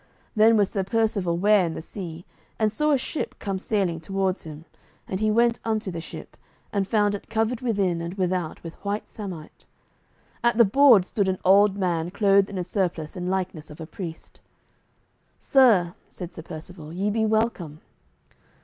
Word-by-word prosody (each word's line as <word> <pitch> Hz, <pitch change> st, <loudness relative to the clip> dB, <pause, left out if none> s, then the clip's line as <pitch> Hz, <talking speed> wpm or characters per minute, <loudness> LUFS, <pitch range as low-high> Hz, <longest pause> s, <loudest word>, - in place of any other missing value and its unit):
Then 220 Hz, +1 st, +5 dB
was 205 Hz, -2 st, +2 dB
Sir 195 Hz, -, -1 dB
Percivale 200 Hz, -4 st, 0 dB
ware 205 Hz, +1 st, +4 dB
in 165 Hz, -2 st, -2 dB
the -, -, -5 dB
sea, 175 Hz, -3 st, -8 dB, 0.3 s
and 215 Hz, -1 st, +1 dB
saw 300 Hz, +8 st, 0 dB
a 290 Hz, -, +4 dB
ship 275 Hz, +4 st, -4 dB
come 195 Hz, -2 st, -3 dB
sailing 190 Hz, -5 st, -1 dB
towards 195 Hz, +2 st, -2 dB
him; 155 Hz, 0 st, -9 dB, 0.4 s
and 190 Hz, -, -3 dB
he 215 Hz, 0 st, +1 dB
went 235 Hz, +2 st, +3 dB
unto 215 Hz, -3 st, -1 dB
the 165 Hz, -1 st, -5 dB
ship, -, -, -10 dB, 0.4 s
and 200 Hz, -2 st, 0 dB
found 205 Hz, -2 st, +2 dB
it 205 Hz, -, -7 dB
covered 225 Hz, +1 st, 0 dB
within 195 Hz, -8 st, 0 dB
and 170 Hz, +2 st, -5 dB
without 180 Hz, -4 st, -2 dB
with 165 Hz, -1 st, -7 dB
white 205 Hz, +1 st, -3 dB
samite. 185 Hz, -7 st, -9 dB, 0.8 s
At 235 Hz, -1 st, +2 dB
the 235 Hz, -, +7 dB
board 235 Hz, -3 st, +6 dB
stood 200 Hz, 0 st, -1 dB
an 190 Hz, 0 st, 0 dB
old 200 Hz, +1 st, +5 dB
man 175 Hz, -3 st, -1 dB
clothed 200 Hz, 0 st, +3 dB
in 200 Hz, -, -6 dB
a 180 Hz, -, -1 dB
surplice 175 Hz, -4 st, -2 dB
in 180 Hz, -1 st, -4 dB
likeness 185 Hz, -5 st, -3 dB
of 150 Hz, -, -12 dB
a 160 Hz, -, -6 dB
priest. 165 Hz, -1 st, -9 dB, 1.0 s
"Sir," 215 Hz, -11 st, +4 dB, 0.2 s
said 180 Hz, -2 st, -8 dB
Sir -, -, -8 dB
Percivale, 160 Hz, 0 st, -9 dB
"ye 200 Hz, +3 st, 0 dB
be 220 Hz, +1 st, 0 dB
welcome." 215 Hz, -9 st, -1 dB
195 Hz, 175 wpm, -25 LUFS, 175-215 Hz, 1.0 s, the